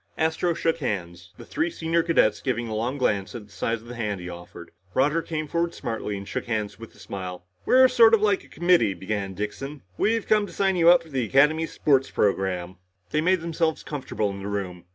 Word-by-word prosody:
Astro 160 +2 0
shook 165 0 0
hands, 90 - -4
the - - -11
three 330 +2 -1
senior 165 - 0
cadets 135 -11 +2
giving 120 +1 -2
a 110 - -4
long 120 +6 -2
glance 105 -6 0
at 110 -3 -7
the 105 - -22
size 115 +3 -2
of - - -15
the 120 - -7
hand 105 -5 -3
he 90 - -7
offered. 85 -1 -10 0.2
Roger 150 +5 +2
came 155 -2 -4
forward 170 +2 -1
smartly 110 -5 -4
and 100 0 -8
shook - - -4
hands 110 -3 -3
with 115 - -11
a - - -19
smile. 90 -2 -7 0.2
"We're 260 0 +7
sorta 230 -3 +6
like 205 -2 +1
a - - -17
committee," 175 - +2
began 95 -1 -4
Dixon. 135 +8 -5 0.2
"We've 225 +1 +1
come 210 -1 +3
to - - -11
sign 195 -1 +1
you 170 -1 +5
up 175 -1 +6
for 165 - -16
the 135 -4 -1
Academy 150 +6 +3
sports 135 -3 +1
program." 95 -3 -1 0.3
They 155 - +1
made 185 +1 +2
themselves 165 -1 -1
comfortable 130 -8 -3
in 100 - -7
the 100 - -6
room. 95 -4 -4
130 Hz, 215 wpm, -25 LUFS, 100-165 Hz, 0.3 s, We're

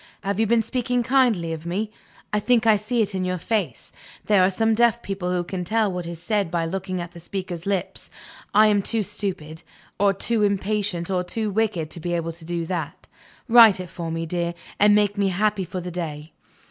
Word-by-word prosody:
"Have 200 +1 -2
you 225 - +3
been 230 +1 +3
speaking 245 +1 -1
kindly 235 -10 +2
of 160 -1 -7
me? 200 +6 -3 0.4
I 210 - +3
think 235 +2 +2
I 220 -1 +6
see 220 +3 0
it 205 -1 -4
in 190 -1 -1
your 185 0 -1
face. 215 +4 -3 0.3
There 205 -3 +4
are 185 - +5
some 225 +3 +1
deaf 235 +1 +2
people 190 -2 -3
who 180 -1 0
can 180 +1 -4
tell 215 +2 +1
what 180 -2 -4
is 170 -1 -6
said 200 +1 -1
by 170 -1 -1
looking 185 +1 -3
at 175 -1 -6
the 175 - -12
speaker's 180 0 -5
lips. 195 -2 -3 0.4
I 215 +1 +6
am 205 -1 +3
too 225 +2 0
stupid, 185 -6 -5 0.4
or 200 0 +4
too 215 +3 0
impatient, 200 -3 0
or 180 -1 +1
too 215 +3 -3
wicked 195 -7 -1
to - - -5
be 175 +2 -3
able 165 -1 -2
to 165 0 -14
do 170 0 -3
that. 165 -3 -5 0.4
Write 225 -5 +8
it 180 -2 -7
for 170 -2 -5
me, 165 0 -3
dear, 170 +1 -2 0.2
and 205 0 +6
make 205 -1 +2
me 200 - +3
happy 195 +1 0
for 185 +1 -5
the 180 0 -6
day." 155 -3 -5
195 Hz, 215 wpm, -23 LUFS, 175-215 Hz, 0.4 s, Write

